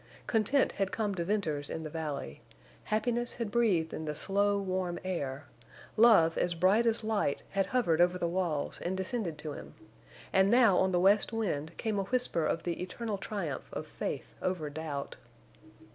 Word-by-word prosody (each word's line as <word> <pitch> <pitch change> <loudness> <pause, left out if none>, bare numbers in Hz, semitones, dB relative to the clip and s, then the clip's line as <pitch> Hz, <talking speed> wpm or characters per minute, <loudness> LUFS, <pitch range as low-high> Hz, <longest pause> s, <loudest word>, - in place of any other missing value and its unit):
Content 235 +5 +2
had 195 -1 -2
come 210 -3 -1
to 175 -3 -2
Venters 165 -7 -1
in 160 - -4
the 155 - -5
valley; 150 - -5 0.4
happiness 240 +2 -1
had 230 -4 -3
breathed 195 -9 +2
in 160 - -4
the 150 -1 -3
slow, 200 +4 +2
warm 185 -3 -2
air; 145 -6 -3 0.5
love 215 -8 +6
as 175 -1 0
bright 195 +7 +3
as 230 0 +2
light 215 -10 0
had 195 -1 +1
hovered 195 -9 +2
over 180 +1 +4
the 175 - -1
walls 170 -4 -1
and 185 +2 -2
descended 190 -4 -2
to 150 0 -6
him; - - -10 0.6
and 190 +1 +5
now 235 -4 +6
on 190 +1 +3
the 175 - +2
west 200 +5 +4
wind 170 -9 -2
came 215 -3 -1
a - - 0
whisper 245 -8 0
of 165 - -1
the 175 0 -3
eternal 200 +3 -4
triumph 170 -12 -4
of - - -5
faith - - -5
over 170 -5 -2
doubt. 145 -2 -5
185 Hz, 175 wpm, -31 LUFS, 160-215 Hz, 0.6 s, love